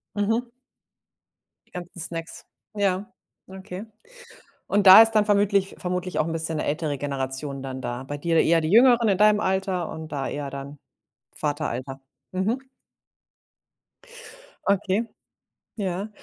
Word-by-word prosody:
Mhm. 225 +4 0 1.2
Die - - -32
ganzen 180 +1 -8
Snacks. 165 0 -6 0.3
Ja, 200 -1 -1 0.4
okay. 190 +2 -8 0.8
Und 205 0 +1
da 190 +4 +12
ist 225 0 +2
dann 210 -1 +3
vermütlich 200 -1 +2
vermutlich 180 0 -3
auch 155 - +1
'n 165 - -3
bisschen 160 0 -2
'ne - - -2
ältere 150 -1 -2
Generation 135 0 -4
dann 130 -1 -6
da. 120 +1 -5
Bei 145 +2 -5
dir 165 +2 +2
eher 165 0 +3
die 155 - -2
Jüngeren 235 +1 +6
in 195 -2 +2
deinem 210 0 +5
Alter 190 -3 -1
und 160 0 -8
da 140 -2 -2
eher 145 -1 -4
dann 140 +1 -8 0.6
Vateralter. 140 -3 -3 0.3
Mhm. 195 +7 -1 2.1
Okay. 200 +2 +1 0.7
Ja. 195 -1 -3
180 Hz, 135 wpm, -24 LUFS, 145-200 Hz, 2.1 s, da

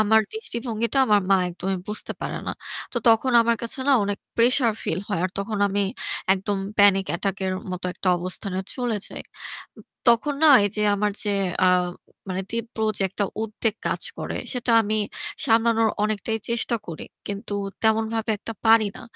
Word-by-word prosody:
আমার 220 +1 +5
দৃষ্টিভঙ্গিটা 235 - -3
আমার 210 -2 +4
মা 195 - +7
একদমই 185 +2 -3
বুঝতে 210 - -3
পারে - - -3
না। - - -1 0.4
তো - - -7
তখন 230 +3 +4
আমার 235 0 +2
কাছে 235 +3 -2
না 280 - +6
অনেক 205 0 -2 0.2
প্রেশার 240 0 +4
ফিল 170 - -1
হয়। 200 -5 -1
আর 185 - -1
তখন 205 +1 -3
আমি 200 +1 0 0.5
একদম 195 +1 -2 0.2
panic 195 -1 +6
attack 195 +2 -2
এর 185 - 0 0.2
মতো 180 0 -5
একটা 190 - -2
অবস্থানে 185 +2 -4 0.2
চলে 245 -4 -1
যাই। - - -8 0.6
উ - - -11 0.3
তখন 235 +5 +3
না - - +8 0.2
এযে 210 +1 -2
আমার 210 0 0
যে 205 - 0 0.4
আ - - +6 0.6
মানে 190 +1 -2
তীব্র 230 0 -4 0.2
যে - - 0
একটা 200 +2 -1 0.2
উদ্বেগ 220 0 -1
কাজ - - -2 0.2
করে - - -4 0.2
সেটা 250 -2 0
আমি 215 +1 0 0.5
সামলানোর 225 -1 +3
অনেকটাই 215 +1 -1
চেষ্টা 235 0 0
করি। 165 -2 -7 0.2
কিন্তু 205 0 -5 0.3
তেমনভাবে 220 0 +1
একটা 225 - -7
পারি 225 -1 +6
না। - - -10
215 Hz, 170 wpm, -24 LUFS, 200-230 Hz, 0.6 s, না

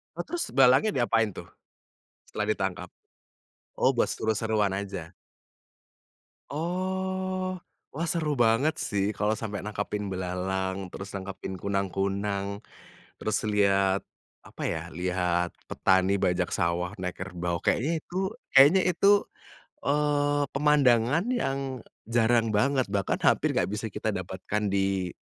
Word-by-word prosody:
Oh - - -3
terus 345 -1 -3
belalangnya 135 +10 +5
diapain 115 -3 +2
tuh - - -7 0.8
setelah 105 - -4
ditangkap? 95 -4 -2 0.9
Oh - - +3
buat - - +4
seru-seruan 110 -2 0
aja? 95 -4 -6 1.4
Oh, 185 +3 -2 0.3
wah 160 +5 -3
seru 155 -4 -1
banget 120 +6 +3
sih 100 -2 -1
kalo 105 +1 +1
sampe 110 -1 -4
nangkepin 105 -1 -3
belalang, 95 +1 -3
terus 95 0 -7
nangkepin 95 0 -6
kunang-kunang, 100 +1 -2 0.6
terus 110 -1 -1 0.2
liat 100 -1 +3 0.4
apa - - -11
ya, - - -3
lihat 90 0 0 0.2
petani 95 +1 +3
bajak 90 0 +1
sawah 85 +1 0
naik 90 -1 -4
kerbau, 90 -2 -3
kayaknya 145 +7 +2
itu 175 - -13 0.4
kayaknya 145 +8 +8
itu, 195 - +2 0.8
eee, 145 0 +2
pemandangan 140 - +3 0.2
yang 135 0 -1 0.5
jarang 115 0 +3
banget 135 +2 +2
bahkan 100 -1 0
hampir - - +3
gak - - +1
bisa 110 +1 -3
kita 110 +1 -2
dapatkan 95 +3 -3
di 95 -2 0
105 Hz, 115 wpm, -27 LUFS, 95-140 Hz, 1.4 s, kayaknya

